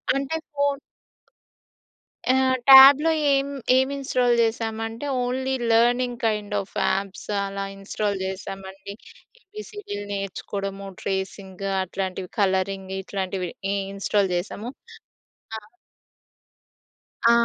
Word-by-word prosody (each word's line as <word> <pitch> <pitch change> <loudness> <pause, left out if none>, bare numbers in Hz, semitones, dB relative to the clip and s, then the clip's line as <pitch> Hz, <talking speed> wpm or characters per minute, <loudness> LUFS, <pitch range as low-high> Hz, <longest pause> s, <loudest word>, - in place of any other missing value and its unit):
అంటే 275 +3 -2 0.2
ఫోన్ 285 -1 0 1.5
ఆ! - - +3 0.3
ట్యాబ్‌లో 275 +4 +10 0.2
ఏం, 275 0 +2 0.3
ఏం 260 0 +3
ఇన్‌‌స్టాల్ 250 -3 +1
చేశామంటే 225 +2 -2 0.2
only 260 +2 -1 0.2
learning 245 +1 +3
kind 210 -1 -1
of 195 - -10
apps 195 -1 -2 0.2
అలా 195 0 -4
ఇన్‌స్టాల్ 200 +1 -2
చేశామండి. 195 +1 -7 0.5
ఏబీసీడీ‌లు 415 - -8
నేర్చుకోవడము, 195 0 -5
ట్రేసింగు 195 0 -4
అట్లాంటివి, 185 0 -4
కలరింగ్ 190 0 0
ఇట్లాంటివి. 190 -2 -3 0.3
ఇన్‌స్టాల్ 195 0 0
చేశాము. 210 +6 -4 0.9
ఆ! - - -5 1.7
ఆ! 235 - +7
205 Hz, 90 wpm, -24 LUFS, 195-250 Hz, 1.7 s, ట్యాబ్‌లో